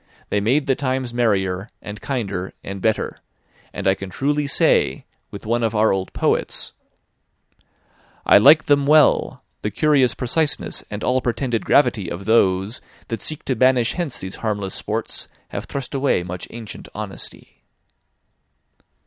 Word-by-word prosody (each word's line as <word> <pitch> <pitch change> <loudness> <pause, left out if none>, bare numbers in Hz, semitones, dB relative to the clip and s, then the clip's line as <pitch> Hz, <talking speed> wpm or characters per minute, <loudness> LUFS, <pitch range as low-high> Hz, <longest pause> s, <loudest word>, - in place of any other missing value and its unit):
They 105 - +1
made 135 +8 +2
the 135 - +2
times 130 -2 -2
merrier, 100 -5 0
and 105 0 -9
kinder, 100 -9 -3
and 100 -1 -6
better; 110 +1 -1 0.5
and - - -4
I 95 - +5
can 95 0 -7
truly 145 +8 -1
say, 140 - +2 0.2
with 100 - -10
one 120 +2 0
of 115 -1 0
our 110 0 +3
old 95 -1 -3
poets: - - -1 1.5
"'I - - +7
like 150 +8 +7
them 145 -1 +3
well 150 -1 +4 0.2
the 105 - -1
curious 130 +2 +2
preciseness 145 +4 0
And 105 0 -6
all 130 +1 +1
pretended 120 -1 -1
gravity 105 -10 +3
of 95 +3 -6
those 100 -1 +2 0.3
That 115 -4 -3
seek 155 - 0
to 130 - 0
banish 125 -1 +3
hence 170 -8 -3
these 95 0 -5
harmless 100 -4 -3
sports, - - -3 0.2
Have - - -5
thrust 140 -1 -5
away 135 -9 +1
much 90 0 -6
ancient 115 -2 -8
honesty.' - - -7
115 Hz, 150 wpm, -21 LUFS, 100-135 Hz, 1.5 s, I